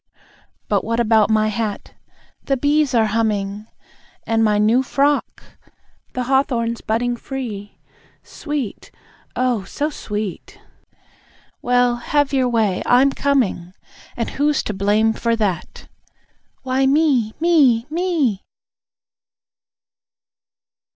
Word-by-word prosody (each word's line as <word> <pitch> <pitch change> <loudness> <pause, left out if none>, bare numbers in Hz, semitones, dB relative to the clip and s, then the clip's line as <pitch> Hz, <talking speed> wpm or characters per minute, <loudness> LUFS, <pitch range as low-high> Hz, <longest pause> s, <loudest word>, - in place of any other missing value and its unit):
But 205 -2 +1
what 230 +1 -1
about 220 -2 +3
my 215 0 +2
hat? 215 -2 -4 0.5
(The 275 - 0
bees 290 0 +1
are 225 -1 +4
humming.) 210 -1 -1 0.6
And 225 0 +1
my 210 -1 +3
new 220 +5 +3
frock? 280 +2 0 0.7
(The 255 - -2
hawthorn's 245 -3 0
budding 240 +2 -1
free! 230 -6 -7 0.5
Sweet! 290 -8 -5 0.5
Oh, 245 -5 0
so 295 +10 -3
sweet!) 210 - -6 1.0
Well, 245 0 +2
have 290 +3 0
your 260 -2 +2
way. 220 -5 +1
I'm 260 +3 +5
coming! 235 -12 -1 0.4
And 230 - -2
who's 295 0 0
to 210 - -3
blame 210 +3 +2
for 230 +1 0
that? 200 -7 -3 0.8
(Why, 265 +1 +1
me! 275 -2 +2
235 Hz, 100 wpm, -20 LUFS, 215-270 Hz, 1.0 s, I'm